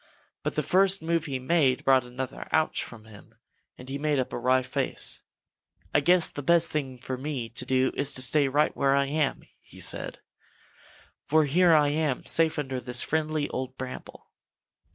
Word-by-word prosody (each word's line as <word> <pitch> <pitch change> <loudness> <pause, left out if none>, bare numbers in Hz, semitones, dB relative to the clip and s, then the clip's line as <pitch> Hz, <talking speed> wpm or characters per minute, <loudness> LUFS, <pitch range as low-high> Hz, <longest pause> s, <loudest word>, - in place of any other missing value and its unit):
But - - -3
the - - 0
first 195 0 +3
move 165 0 0
he 135 -4 -3
made 130 -1 +1
brought 130 -1 +5
another 125 +1 -6
"Ouch" 155 0 +1
from 110 -2 -11
him, 105 -2 -16 0.4
and 125 - -12
he 135 +1 -4
made 150 0 0
up 130 - -2
a - - -3
wry 130 +1 +2
face. - - -2 0.7
"I - - +5
guess 175 +4 +3
the 145 - -6
best 170 +3 +3
thing 135 -4 -3
for 125 +1 -6
me 135 -5 -4
to 125 +2 -4
do 130 0 +2
is 140 0 0
to 130 - 0
stay 140 +2 +3
right 145 +3 +1
where 140 0 +2
I 140 0 +2
am," 150 0 -1 0.4
said - - -1
he, - - -29 1.1
"for 155 0 +4
here 170 +4 +4
I 150 -2 +4
am 150 -3 -1
safe 160 -1 +2
under 135 -3 -3
this 125 -1 -1
friendly 155 -1 -1
old 130 0 -5
bramble." 130 0 -9
140 Hz, 185 wpm, -27 LUFS, 130-155 Hz, 1.1 s, brought